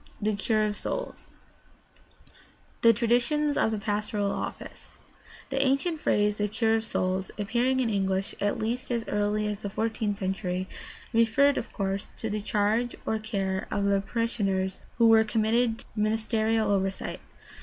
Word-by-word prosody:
THE 215 0 0
CURE 215 +2 +1
OF 210 -1 -1
SOULS - - -5 1.5
The 230 - +8
traditions 245 +6 +2
of - - +3
the 220 - -1
pastoral 205 -1 -1
office. - - -7 0.2
— - - -20
The 270 0 +2
ancient 275 +4 +1
phrase, 210 0 +2
"the 210 - +1
cure 220 +2 +1
of 220 - -3
souls," 185 -2 -1
appearing 240 +5 +1
in 240 -3 +1
English 195 -1 0
at 205 0 +1
least 240 +4 -2
as 235 -2 -1
early 210 +1 0
as 210 -1 -2
the 205 - -4
fourteenth 220 0 -1
century, 185 -1 -2 0.5
referred, 230 +5 +4
of - - -7
course, 195 -1 -3
to 225 - -3
the 210 0 -2
charge 215 +4 +1
or 220 - 0
care 195 -3 -2
of 200 - -1
the 200 0 +3
parishioners 195 -4 -1 0.2
who 230 - +5
were 225 -1 +7
committed 225 +1 +1
to - - -10
the 210 - -2
ministerial 220 0 +1
oversight. 195 -1 -1
215 Hz, 160 wpm, -27 LUFS, 200-230 Hz, 1.5 s, The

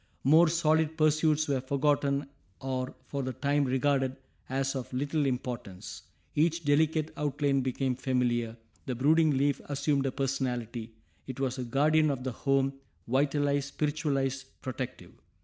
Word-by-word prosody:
More 160 +6 +6
solid 160 -1 +2
pursuits 155 0 +3
were 135 -3 0
forgotten 140 +1 +1 0.3
or 130 -1 -3
for 140 - -3
the 130 -1 -3
time 145 +1 +1
regarded 135 0 +1 0.3
as 135 +1 -1
of 130 -1 -5
little 145 +3 0
importance; 120 -7 -5 0.3
each 165 +1 +1
delicate 155 +2 +2
outline 145 -1 +1
became 130 0 -1
familiar; 120 -3 0 0.3
the 130 - -1
brooding 155 +5 +4
leaf 140 +1 +1
assumed 140 -1 0
a - - 0
personality; 125 -4 -2 0.3
it 130 0 -6
was 130 -1 -1
a - - -1
guardian 150 +5 +3
of 135 -3 -2
the 130 - -2
home, 135 +2 +1 0.3
vitalized, 140 +2 +1
spiritualized, 140 -3 -1 0.2
protective. 130 -1 -5
140 Hz, 135 wpm, -29 LUFS, 130-150 Hz, 0.3 s, More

